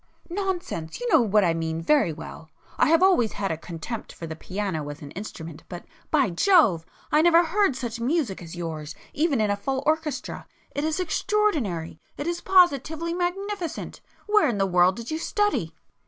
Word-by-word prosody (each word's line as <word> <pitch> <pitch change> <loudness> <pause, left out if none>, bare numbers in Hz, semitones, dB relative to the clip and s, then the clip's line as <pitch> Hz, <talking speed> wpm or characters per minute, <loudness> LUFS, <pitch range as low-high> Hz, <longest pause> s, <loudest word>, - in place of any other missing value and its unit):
"Nonsense! 355 - -3
you - - -3
know 320 - +6
what 210 -2 +3
I 170 -2 +3
mean 165 0 -2
very 265 - +3
well. 160 0 -9 0.3
I - - +5
have 330 +2 +5
always 305 - +4
had 200 -2 -2
a - - 0
contempt 170 +7 -7
for 165 - -8
the 160 -1 -6
piano 180 -4 -4
as 145 +1 -8
an 140 - -9
instrument, 165 -5 -8
but 175 -1 -8 0.2
by 275 - +2
Jove! 190 - +4 0.2
I 300 - +5
never 340 +1 +6
heard 360 -3 +1
such 240 -2 -4
music 250 - -1
as 170 0 -9
yours 160 -3 -5 0.2
even 300 -4 +1
in 210 -1 +2
a - - +1
full 265 +6 -3
orchestra. 310 -3 -2 0.2
It 285 - -3
is 315 +2 -1
extraordinary!—it 295 - -1
is 345 +1 -2
positively 335 -2 +3
magnificent! 365 0 -3 0.2
Where 420 -7 +4
in 225 - -1
the 195 - +2
world 180 0 +4
did 235 +4 -7
you 315 - -2
study?" 415 +4 0
245 Hz, 180 wpm, -25 LUFS, -, 0.3 s, know